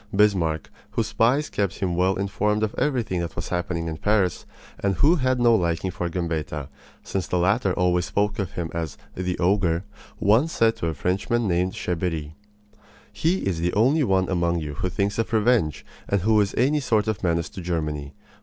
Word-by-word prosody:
Bismarck, 95 -7 +2 0.2
whose - - -1
spies 130 +7 +1
kept 100 -3 -1
him 90 -3 -1
well 95 +2 +2
informed 105 +2 0
of 110 - -1
everything 120 -11 0
that 85 -1 -4
was 85 - -5
happening 85 -2 -2
in 80 -1 -4
Paris, 100 -2 +1 0.3
and 100 -1 0
who 155 - +4
had 130 -2 +1
no 120 -1 +5
liking 90 -2 0
for 85 -1 -3
Gambetta, 80 -5 -3 0.3
since 95 -2 -3
the 90 - 0
latter 100 +3 +2
always 90 -1 +1
spoke 105 +2 -1
of 95 -4 -3
him 85 -4 -4
as 80 -3 -4 0.2
"the 90 -1 -2
Ogre," 90 -2 +2 0.4
once 115 +11 +3
said 115 0 +3
to 85 - -2
a 80 - -2
Frenchman 100 +9 0
named 90 +1 +1
Cheberry: 85 -7 -3 0.8
"He 165 - 0
is 90 -4 -1
the 85 +1 0
only 135 +9 +3
one 95 -5 +2
among 85 -2 +1
you 75 -3 -4
who 90 - -2
thinks 100 +3 -1
of 115 - -1
revenge, 110 - +2 0.2
and 100 -2 +1
who 110 +2 +4
is 100 - -1
any 140 +5 +3
sort 110 -6 +1
of 110 -3 -1
a - - +2
menace 85 0 0
to 95 - -8
Germany. 75 -5 -3
95 Hz, 190 wpm, -24 LUFS, 85-110 Hz, 0.8 s, no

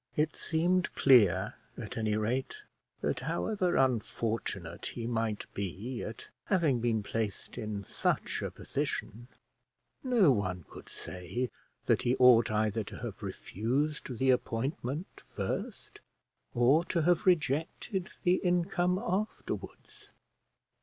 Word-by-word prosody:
It 150 +1 +1
seemed 175 +2 +1
clear 115 -11 +5 0.2
at - - -6
any 110 -1 0
rate 130 - -2 0.4
that, - - 0
however 190 -5 0
unfortunate 110 -8 -1
he 115 - -5
might 115 -3 -1
be 100 +6 -4
at 110 - -7 0.2
having 160 - +2
been 115 -2 +1
placed 110 -1 -3
in 105 -4 -4
such - - -1
a - - -2
position, 120 +4 -4 0.8
no 235 - +5
one 95 -7 -1
could - - -12
say 105 +8 -4 0.3
that - - +3
he 125 0 +2
ought 125 -3 +7
either 110 0 +1
to - - -8
have - - -6
refused 130 - -2
the 130 +1 +4
appointment 130 +6 -2
first, - - -4 0.6
or 130 +7 +5
to 170 -3 0
have 175 +2 +2
rejected 175 - +1
the 180 +1 +4
income 180 0 +1
afterwards. 215 0 -4
125 Hz, 120 wpm, -31 LUFS, 110-170 Hz, 0.8 s, ought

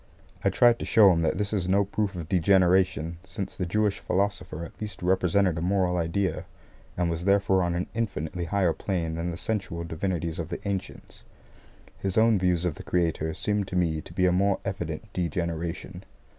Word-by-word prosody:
I - - +4
tried 120 +5 +4
to - - -4
show 105 -4 +6
him 85 - +1
that 80 - +1
this 105 +1 -2
is 95 -3 -1
no 100 +2 +3
proof 100 0 -2
of 85 -3 -5
degeneration, 90 -3 +3
since 95 0 -6
the 90 - -3
Jewish 105 +2 +1
Philosopher 90 -3 -1
at - - -14
least 105 -4 -6
represented 90 -1 +2
a - - -4
moral 90 0 +1
idea, 85 +1 -1 0.5
and 90 -1 +1
was 85 +1 -3
therefore 100 -1 +3
on 85 -1 0
an 90 - -1
infinitely 90 -6 -3
higher 90 -1 +1
plane 85 -2 -2
than 85 +2 -2
the 85 - -5
sensual 95 -5 -3
divinities 85 0 -3
of 80 -1 -4
the - - -5
ancients. 100 -2 -5 0.8
His 95 0 -2
own 110 -2 +5
views 90 -1 +1
of 90 - 0
the - - -10
Creator 80 -2 0
seem 105 -1 0
to 95 - -6
me 80 -3 +1
to - - -13
be 90 +2 +1
a 90 - +4
more 95 +2 +2
evident - - -4
degeneration. 85 +1 -3
90 Hz, 190 wpm, -27 LUFS, 85-100 Hz, 0.8 s, show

